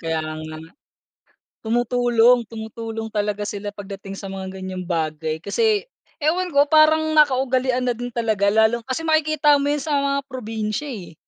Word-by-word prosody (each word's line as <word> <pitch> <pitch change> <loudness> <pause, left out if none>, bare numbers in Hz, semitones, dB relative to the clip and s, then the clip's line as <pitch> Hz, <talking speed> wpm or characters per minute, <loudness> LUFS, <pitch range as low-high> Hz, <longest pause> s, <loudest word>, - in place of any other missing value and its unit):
Kaya 160 -1 -1
nga, 155 0 -6 1.1
tumutulong, 240 +1 +3
tumutulong 225 0 -6
talaga 210 -1 -2
sila 205 0 -4
pagdating 195 -1 -8
sa 200 - -7
mga 190 0 -6
ganyang 185 -1 -5
bagay 160 -2 -2
kasi 420 - 0 0.3
ewan 345 +4 0
ko 285 -2 +5
parang 315 +1 +4
nakaugalian 255 -3 +2
na 245 - +2
din 245 +1 -5
talaga 220 -4 0
lalo 220 +2 +3
kasi 260 +6 -4
makikita 310 -1 +3
mo 285 - 0
yun 295 - +1
sa 300 +1 -3
mga 280 0 +1
probinsya 225 +1 -4
eh, 195 -9 -8
230 Hz, 150 wpm, -22 LUFS, 200-280 Hz, 1.1 s, ko